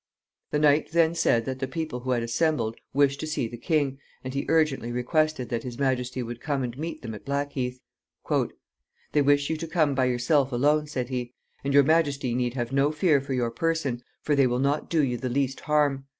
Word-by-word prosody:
The -, -, 0 dB
knight 150 Hz, +1 st, +3 dB
then 165 Hz, -1 st, +4 dB
said 120 Hz, -9 st, +2 dB
that 130 Hz, -1 st, -4 dB
the 135 Hz, -, -2 dB
people 155 Hz, -2 st, -4 dB
who 130 Hz, +1 st, -6 dB
had 120 Hz, -2 st, +1 dB
assembled 115 Hz, -2 st, 0 dB, 0.2 s
wished 140 Hz, 0 st, +2 dB
to 155 Hz, -, -4 dB
see 150 Hz, -6 st, -1 dB
the 120 Hz, -, -8 dB
king, 140 Hz, +1 st, 0 dB, 0.2 s
and 130 Hz, 0 st, -5 dB
he 140 Hz, -, -2 dB
urgently 155 Hz, -7 st, +2 dB
requested 130 Hz, +2 st, 0 dB
that 115 Hz, -, -1 dB
his 120 Hz, -2 st, -7 dB
majesty 130 Hz, -2 st, -1 dB
would 120 Hz, 0 st, -7 dB
come 140 Hz, -3 st, -1 dB
and 120 Hz, -1 st, -4 dB
meet 160 Hz, +2 st, -5 dB
them 115 Hz, -2 st, -5 dB
at 105 Hz, -, -9 dB
Blackheath. 140 Hz, -3 st, -2 dB, 1.3 s
"They 150 Hz, -, +4 dB
wish 145 Hz, +1 st, +3 dB
you 160 Hz, -, -1 dB
to 165 Hz, +1 st, -5 dB
come 155 Hz, -3 st, +2 dB
by 130 Hz, -1 st, +2 dB
yourself 130 Hz, +3 st, +2 dB
alone," 150 Hz, +5 st, +2 dB
said 130 Hz, -4 st, -3 dB
he. 125 Hz, -1 st, -4 dB, 0.3 s
"And 140 Hz, -, -1 dB
your 140 Hz, 0 st, +6 dB
majesty 140 Hz, -4 st, +2 dB
need 125 Hz, 0 st, -1 dB
have 120 Hz, -2 st, -2 dB
no 140 Hz, +2 st, +2 dB
fear 155 Hz, -3 st, +3 dB
for 135 Hz, -1 st, -3 dB
your 120 Hz, -2 st, 0 dB
person, 150 Hz, -4 st, -1 dB, 0.2 s
for 150 Hz, -, +2 dB
they 135 Hz, -2 st, +4 dB
will 125 Hz, 0 st, 0 dB
not 140 Hz, +3 st, 0 dB
do 160 Hz, -3 st, +2 dB
you 125 Hz, -3 st, 0 dB
the 130 Hz, +1 st, -3 dB
least 135 Hz, +1 st, -1 dB
harm. 145 Hz, -3 st, +1 dB
135 Hz, 215 wpm, -26 LUFS, 125-150 Hz, 1.3 s, your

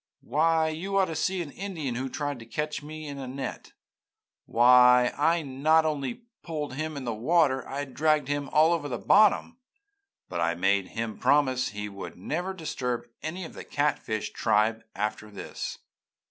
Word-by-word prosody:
Why, 160 Hz, +4 st, +2 dB
you 190 Hz, +5 st, -2 dB
ought 190 Hz, -3 st, +3 dB
to -, -, -6 dB
see 180 Hz, +3 st, 0 dB
an 145 Hz, -, -10 dB
Indian 170 Hz, -9 st, -4 dB
who 130 Hz, +3 st, -3 dB
tried 145 Hz, -1 st, -3 dB
to 115 Hz, -, -10 dB
catch 150 Hz, +5 st, -3 dB
me 155 Hz, +1 st, -8 dB
in 140 Hz, -1 st, -6 dB
a 130 Hz, -, -5 dB
net! 130 Hz, 0 st, -6 dB, 0.7 s
Why, 125 Hz, +1 st, +6 dB
I 165 Hz, +3 st, +2 dB
not 150 Hz, +4 st, +3 dB
only 155 Hz, -, -2 dB, 0.2 s
pulled 150 Hz, -5 st, -4 dB
him 155 Hz, +2 st, -4 dB
in 135 Hz, -, -5 dB
the 120 Hz, -, -1 dB
water 135 Hz, +4 st, +3 dB
and 135 Hz, 0 st, -6 dB
dragged 155 Hz, 0 st, +2 dB
him 145 Hz, -1 st, -2 dB
all 160 Hz, +3 st, +5 dB
over 155 Hz, -4 st, -2 dB
the 120 Hz, -, -2 dB
bottom, 215 Hz, -, +4 dB, 0.7 s
but 85 Hz, -1 st, -3 dB
I 85 Hz, +1 st, +1 dB
made 95 Hz, +2 st, +2 dB
him 115 Hz, -1 st, -3 dB
promise 130 Hz, -3 st, +3 dB
he 105 Hz, -2 st, -5 dB
would 100 Hz, -1 st, -8 dB
never 175 Hz, -, -3 dB
disturb 125 Hz, -8 st, -3 dB
any 170 Hz, +4 st, -4 dB
of -, -, -10 dB
the -, -, -8 dB
catfish 140 Hz, -7 st, -1 dB
tribe 110 Hz, +2 st, +1 dB
after 105 Hz, +1 st, -3 dB
this!' 100 Hz, -, -6 dB
145 Hz, 175 wpm, -27 LUFS, 120-160 Hz, 0.7 s, Why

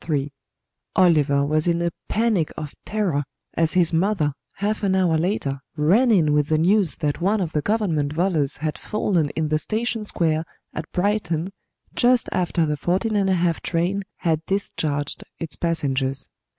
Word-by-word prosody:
III 145 Hz, -2 st, 0 dB, 0.6 s
Oliver 145 Hz, -6 st, +4 dB
was 155 Hz, +3 st, +1 dB
in 170 Hz, 0 st, +2 dB
a 170 Hz, 0 st, 0 dB, 0.2 s
panic 215 Hz, -8 st, +1 dB
of 150 Hz, -2 st, -5 dB
terror 190 Hz, -9 st, 0 dB, 0.3 s
as 165 Hz, -1 st, +1 dB
his 175 Hz, -2 st, +3 dB
mother, 165 Hz, -4 st, +1 dB, 0.2 s
half 205 Hz, +2 st, -2 dB
an 195 Hz, -2 st, +2 dB
hour 180 Hz, -4 st, +3 dB
later, 160 Hz, -5 st, -1 dB, 0.2 s
ran 185 Hz, +12 st, +4 dB
in 165 Hz, -9 st, +4 dB
with 150 Hz, -1 st, +2 dB
the 155 Hz, -, +2 dB
news 185 Hz, +1 st, +3 dB
that 150 Hz, +2 st, -2 dB
one 205 Hz, +4 st, +2 dB
of 175 Hz, -4 st, -2 dB
the 150 Hz, -, 0 dB
Government 170 Hz, -8 st, 0 dB
volors 155 Hz, -4 st, 0 dB
had 155 Hz, +1 st, -3 dB
fallen 180 Hz, -8 st, 0 dB
in 155 Hz, -1 st, 0 dB
the 155 Hz, 0 st, +2 dB
station 225 Hz, +5 st, -1 dB
square 160 Hz, -5 st, 0 dB, 0.3 s
at 155 Hz, -, -6 dB
Brighton 180 Hz, -3 st, 0 dB, 0.4 s
just 245 Hz, 0 st, +3 dB
after 175 Hz, -2 st, +1 dB
the 150 Hz, -1 st, -1 dB
14¹⁄₂ 185 Hz, -1 st, +1 dB
train 180 Hz, +4 st, 0 dB, 0.2 s
had 160 Hz, -3 st, +1 dB
discharged 150 Hz, -7 st, -2 dB
its 155 Hz, -6 st, -4 dB
passengers. 135 Hz, -5 st, -1 dB
170 Hz, 155 wpm, -23 LUFS, 150-195 Hz, 0.6 s, Oliver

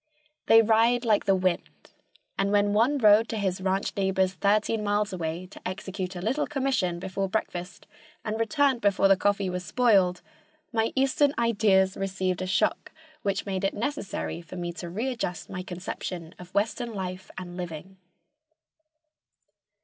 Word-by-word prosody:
They 225 Hz, 0 st, +7 dB
ride 230 Hz, +2 st, +3 dB
like 215 Hz, -3 st, +3 dB
the 195 Hz, -, +4 dB
wind, 185 Hz, -1 st, -2 dB, 0.4 s
and 195 Hz, +1 st, 0 dB
when 205 Hz, 0 st, +3 dB
one 235 Hz, +7 st, +3 dB
rode 215 Hz, -2 st, +5 dB
to 225 Hz, -, -2 dB
his 190 Hz, -2 st, -1 dB
ranch 190 Hz, +1 st, -1 dB
neighbor's 190 Hz, -1 st, +1 dB
thirteen 210 Hz, +3 st, +1 dB
miles 205 Hz, 0 st, 0 dB
away 170 Hz, 0 st, -3 dB
to -, -, -12 dB
execute 185 Hz, 0 st, -5 dB
a 175 Hz, -, -5 dB
little 260 Hz, +8 st, 0 dB
commission 260 Hz, -11 st, 0 dB
before 190 Hz, +2 st, -3 dB
breakfast 180 Hz, -3 st, -4 dB, 0.4 s
and 220 Hz, 0 st, -2 dB
returned 265 Hz, +2 st, +2 dB
before 200 Hz, -1 st, +3 dB
the 195 Hz, -, +6 dB
coffee 200 Hz, 0 st, +1 dB
was 180 Hz, 0 st, -3 dB
spoiled, 195 Hz, -7 st, +3 dB, 0.5 s
my 225 Hz, -1 st, +1 dB
eastern 275 Hz, +2 st, +2 dB
ideas 205 Hz, -5 st, +3 dB
received 185 Hz, -2 st, -2 dB
a 185 Hz, -, -2 dB
shock 190 Hz, -, 0 dB, 0.3 s
which 200 Hz, -1 st, -1 dB
made 195 Hz, -1 st, -3 dB
it 195 Hz, -, 0 dB
necessary 230 Hz, -, -3 dB
for 170 Hz, +2 st, -11 dB
me 175 Hz, -1 st, -4 dB
to 175 Hz, 0 st, -7 dB
readjust 220 Hz, -4 st, -3 dB
my 180 Hz, -, -4 dB
conception 180 Hz, -2 st, -6 dB
of 180 Hz, 0 st, -11 dB
western 225 Hz, +2 st, -1 dB
life 185 Hz, -1 st, -5 dB
and 180 Hz, -2 st, -7 dB
living. 180 Hz, +1 st, -7 dB
195 Hz, 155 wpm, -27 LUFS, 185-225 Hz, 0.5 s, They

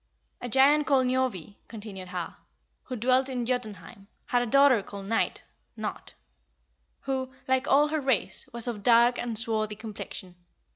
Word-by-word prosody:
10. 245 Hz, -, -4 dB
"A -, -, -7 dB
giant 285 Hz, +4 st, +4 dB
called 270 Hz, -3 st, +3 dB
Njorvi," 250 Hz, -8 st, -2 dB
continued 205 Hz, -4 st, -9 dB
Har, 180 Hz, -2 st, -6 dB, 0.5 s
"who 255 Hz, -, -5 dB
dwelt 255 Hz, +3 st, +2 dB
in 250 Hz, -2 st, -3 dB
Jotunheim, 215 Hz, -5 st, -5 dB, 0.2 s
had 245 Hz, -, +1 dB
a 245 Hz, -, -2 dB
daughter 275 Hz, -2 st, +5 dB
called 200 Hz, 0 st, -9 dB
Night 225 Hz, +3 st, -1 dB, 0.3 s
(Nott) -, -, -6 dB, 0.9 s
who, 260 Hz, -1 st, -3 dB, 0.2 s
like 260 Hz, 0 st, +1 dB
all 295 Hz, +2 st, +4 dB
her 310 Hz, 0 st, -1 dB
race, 265 Hz, -7 st, -1 dB
was 235 Hz, 0 st, 0 dB
of 235 Hz, -3 st, -3 dB
a -, -, -10 dB
dark 235 Hz, +3 st, +4 dB
and 235 Hz, -2 st, -1 dB
swarthy 215 Hz, -2 st, +1 dB
complexion. 205 Hz, -4 st, -9 dB
240 Hz, 160 wpm, -27 LUFS, 210-260 Hz, 0.9 s, daughter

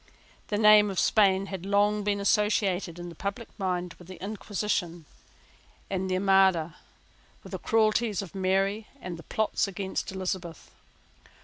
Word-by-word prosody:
The 205 Hz, -, -1 dB
name 210 Hz, -1 st, +7 dB
of 195 Hz, -, -5 dB
Spain 195 Hz, -3 st, +3 dB
had 190 Hz, -3 st, -6 dB
long 205 Hz, +1 st, +2 dB
been 200 Hz, 0 st, 0 dB
associated 200 Hz, -4 st, +1 dB
in 175 Hz, 0 st, -7 dB
the -, -, -9 dB
public 200 Hz, +7 st, -5 dB
mind 180 Hz, -2 st, -2 dB
with 175 Hz, -, -14 dB
the 185 Hz, -, -10 dB
Inquisition 195 Hz, -4 st, -3 dB, 0.9 s
and 190 Hz, -1 st, -1 dB
the 185 Hz, -, +1 dB
Armada, 190 Hz, -4 st, +3 dB, 0.7 s
with -, -, -12 dB
the -, -, -4 dB
cruelties 220 Hz, -2 st, +1 dB
of 190 Hz, -, -11 dB
Mary 195 Hz, +3 st, 0 dB
and 180 Hz, -6 st, -6 dB
the -, -, -10 dB
plots 220 Hz, -1 st, 0 dB
against 195 Hz, 0 st, -4 dB
Elizabeth. 185 Hz, -3 st, -5 dB
195 Hz, 145 wpm, -27 LUFS, 185-210 Hz, 0.9 s, name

